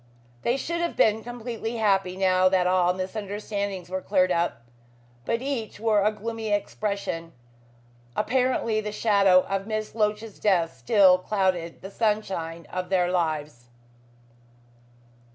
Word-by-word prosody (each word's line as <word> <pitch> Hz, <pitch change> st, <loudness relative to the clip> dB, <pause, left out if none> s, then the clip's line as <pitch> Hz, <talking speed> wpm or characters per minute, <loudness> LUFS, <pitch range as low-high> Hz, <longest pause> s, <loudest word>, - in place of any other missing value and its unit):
They 240 Hz, +3 st, +1 dB
should 340 Hz, +4 st, -3 dB
have 345 Hz, -, -2 dB
been 220 Hz, 0 st, +3 dB
completely 235 Hz, -1 st, -5 dB
happy 195 Hz, -4 st, +1 dB
now 185 Hz, -1 st, +4 dB
that 185 Hz, -1 st, +2 dB
all 180 Hz, -1 st, +3 dB
misunderstandings 200 Hz, -1 st, -4 dB
were 185 Hz, +1 st, -3 dB
cleared 185 Hz, -2 st, +2 dB
up, 170 Hz, -9 st, 0 dB, 0.6 s
but 230 Hz, -, -1 dB
each 255 Hz, -7 st, -4 dB
wore 215 Hz, -2 st, +2 dB
a 210 Hz, -, +3 dB
gloomy 225 Hz, +1 st, -5 dB
expression. 200 Hz, -5 st, -2 dB, 0.8 s
Apparently 250 Hz, -2 st, +1 dB
the 210 Hz, 0 st, -4 dB
shadow 200 Hz, -4 st, +4 dB
of 195 Hz, +1 st, -3 dB
Miss 215 Hz, -1 st, -3 dB
Loach's 210 Hz, -1 st, -1 dB
death 175 Hz, -8 st, +2 dB
still 185 Hz, -, +5 dB
clouded 185 Hz, -4 st, -1 dB
the 195 Hz, -, -7 dB
sunshine 195 Hz, -7 st, -2 dB
of 185 Hz, 0 st, -4 dB
their 180 Hz, -2 st, +2 dB
lives. 155 Hz, -8 st, -2 dB
200 Hz, 130 wpm, -26 LUFS, 185-215 Hz, 0.8 s, still